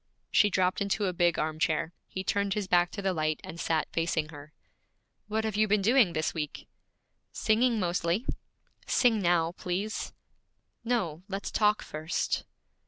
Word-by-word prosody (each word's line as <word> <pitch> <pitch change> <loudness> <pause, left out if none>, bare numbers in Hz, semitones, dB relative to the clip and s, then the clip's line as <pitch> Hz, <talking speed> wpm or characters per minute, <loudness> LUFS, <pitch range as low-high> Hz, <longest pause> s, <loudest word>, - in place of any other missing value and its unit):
She 205 - +5
dropped 185 0 +1
into 200 +1 0
a 185 - 0
big 175 -1 +2
arm 155 0 -2
chair. 160 +2 0
He 190 - -5
turned 200 0 0
his 210 -3 -2
back 175 -1 +4
to 200 - -5
the 190 -1 +1
light, 155 -2 0
and 170 - -8
sat 160 -2 0
facing 165 -2 0
her. 150 -1 -11 0.8
'What 220 +1 -1
have 220 -2 -2
you 215 +1 +3
been 205 -1 +2
doing 225 -4 +4
this 155 0 -1
week?' 150 -3 -5 0.7
'Singing 230 +1 +2
mostly.' 175 +4 0 0.6
'Sing 230 -4 +3
now, 170 -2 +2
please.' 185 +4 -3 0.7
'No, 205 -10 -1
let's 195 -1 -4
talk 210 0 +2
first.' 155 +3 -2
185 Hz, 160 wpm, -29 LUFS, 165-210 Hz, 0.8 s, She